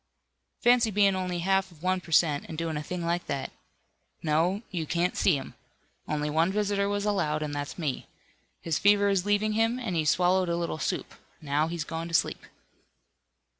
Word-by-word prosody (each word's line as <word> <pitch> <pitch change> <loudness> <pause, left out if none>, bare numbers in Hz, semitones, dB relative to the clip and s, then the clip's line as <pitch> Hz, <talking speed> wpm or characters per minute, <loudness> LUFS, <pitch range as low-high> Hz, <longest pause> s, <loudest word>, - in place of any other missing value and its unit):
Fancy 240 -1 +5
being 200 -1 +3
only 180 -2 -2
half 195 0 +2
of 165 -1 -18
one 185 0 +1
per 170 -2 -13
cent, 150 -3 +3
and 160 - -6
doing 165 -1 -2
a 150 - -2
thing 175 +3 -4
like 170 +1 -1
that. 140 -1 -3 0.7
No, 170 +7 +1
you 165 -4 -3
can't 175 +2 0
see 180 - +3
him. 135 -2 -6 0.5
Only 150 0 -1
one 160 +4 +2
visitor 200 -1 0
was 205 0 -1
allowed, 155 -7 0
and 150 -1 -4
that's 145 0 -4
me. 150 -7 -3 0.5
His 165 -3 -1
fever 205 0 +4
is 195 -1 +1
leaving 210 +1 +2
him, 225 +2 +1
and 235 -8 -3
he 160 - +1
swallowed 180 +3 +3
a 170 - 0
little 170 -2 -3
soup. - - -3 0.3
Now, 150 0 0
he's 170 -1 -3
going 165 +2 -5
to 165 - -2
sleep." - - +1
175 Hz, 190 wpm, -28 LUFS, 155-200 Hz, 0.7 s, Fancy